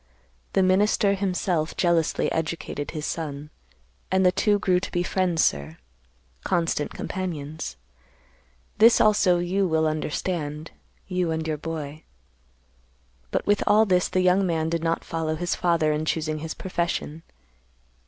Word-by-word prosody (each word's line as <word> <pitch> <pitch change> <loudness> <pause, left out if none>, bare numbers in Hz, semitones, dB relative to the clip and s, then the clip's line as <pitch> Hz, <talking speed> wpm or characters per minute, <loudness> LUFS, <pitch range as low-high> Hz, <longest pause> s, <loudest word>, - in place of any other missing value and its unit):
The 190 - +3
minister, 200 +2 +3
himself, 180 -4 -1
jealously 170 -3 +1
educated 160 -2 -3
his 155 -2 -5
son, 150 -2 -5 0.6
and 190 0 +2
the 180 - +6
two 205 +2 +2
grew 185 -3 +2
to - - -6
be 175 - 0
friends, 180 -3 +1
sir, 70 +3 -1 0.7
constant 165 -4 0
companions. 155 - -5 1.0
This, 225 +2 +7
also, 205 -4 +4
you 185 +3 0
will 160 -1 +1
understand—you 155 +3 -3
and 160 0 -2
your 155 -1 -1
boy. 155 -1 -6 1.3
But - - -1
with 205 0 +2
all 215 +1 +5
this 180 -3 +2
the 185 - +1
young 185 +2 +4
man 165 -3 0
did 165 0 -2
not 165 0 0
follow 160 -1 -2
his 175 +2 -2
father 165 -3 +1
in 150 +1 -2
choosing 155 -1 -1
his 160 +1 -5
profession. 170 -3 -3
170 Hz, 135 wpm, -25 LUFS, 155-185 Hz, 1.3 s, This